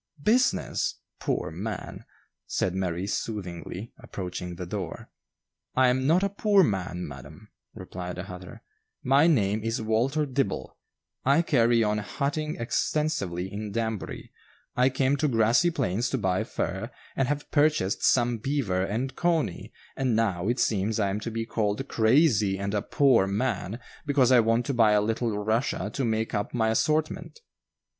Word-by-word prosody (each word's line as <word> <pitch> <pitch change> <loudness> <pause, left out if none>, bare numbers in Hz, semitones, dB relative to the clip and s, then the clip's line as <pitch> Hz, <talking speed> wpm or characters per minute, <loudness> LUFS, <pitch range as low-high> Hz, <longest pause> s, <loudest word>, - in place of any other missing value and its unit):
"Business! 245 +4 +2 0.2
poor - - -2
man!" 105 +7 -6 0.4
said 90 - -1
Mary 90 -1 -2
soothingly, 100 -1 -5
approaching 90 -1 -6
the 90 +1 -6
door. 95 -1 -6 0.6
"I 130 -1 +5
am 130 +1 +1
not 175 +5 +4
a 200 - +2
poor 200 0 +4
man, 90 - -2
madam," 75 +9 -11 0.3
replied 90 -3 -6
the 90 - -5
hatter. 90 -1 -10 0.4
"My 140 +5 +5
name 110 -9 +2
is 115 +2 -1
Walter 120 +7 +1
Dibble; 135 -7 -2 0.5
I 140 +5 +4
carry 120 -6 +3
on 105 0 +1
hatting 145 +8 -2
extensively 100 - -1
in 105 0 -5
Danbury; 110 -2 -4 0.4
I 125 +1 +4
came 135 +2 +1
to 150 +2 +1
Grassy 120 +6 +3
Plains 120 - -1
to 135 - -1
buy 95 -1 0
fur, 95 +1 -3 0.3
and 135 - +1
have 145 +1 -3
purchased 145 -10 +2
some 120 -2 +3
'beaver' 110 -8 0
and 120 +8 -2
'cony,' 165 - 0 0.2
and 130 -4 0
now 100 -5 0
it 120 +2 0
seems 105 0 +1
I 100 -2 +1
am 100 - -2
to 115 - -4
be 115 0 -3
called 110 +3 -1
'crazy' 110 -5 +3
and 100 +1 -3
a 105 - +1
'poor 130 -8 +3
man,' 105 0 -1 0.3
because 135 -3 +3
I 125 - +7
want 115 +1 +2
to 140 - -1
buy 110 -3 +4
a 105 - +5
little 110 0 -1
'Russia' 115 +10 -1
to 140 - -2
make 110 -1 -1
up 105 +3 -2
my 110 -2 +2
assortment." 155 - 0
115 Hz, 155 wpm, -27 LUFS, 100-135 Hz, 0.6 s, I